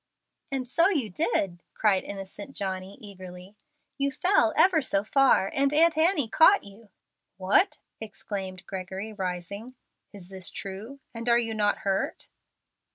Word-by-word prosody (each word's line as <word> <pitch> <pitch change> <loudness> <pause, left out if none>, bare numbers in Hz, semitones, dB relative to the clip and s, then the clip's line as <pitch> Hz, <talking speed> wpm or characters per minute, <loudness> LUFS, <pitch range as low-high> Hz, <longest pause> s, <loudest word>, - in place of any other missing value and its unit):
"And 260 -2 -3
so 335 +8 +3
you 275 - -1
did," 175 -1 -1
cried 200 -4 +2
innocent 200 +5 -8
Johnny, 190 0 -4
eagerly. 185 -1 -11 0.4
"You 280 0 +1
fell 370 +8 +3
ever 360 -4 +5
so 200 -7 0
far, 260 -4 +3
and 275 0 +2
Aunt 325 +2 +4
Annie 315 -4 +3
caught 325 - +5
you." 205 +2 -15 0.5
"What!" 195 - +2 0.2
exclaimed 195 -4 -6
Gregory, 190 +3 -6
rising. 200 +5 -5 0.4
"Is 190 -3 -13
this 190 -2 -5
true? 210 +8 -7
And 230 +1 -3
are 235 - +5
you 225 -2 -1
not 210 -1 +1
hurt?" 195 0 -2
210 Hz, 140 wpm, -27 LUFS, 190-270 Hz, 0.5 s, ever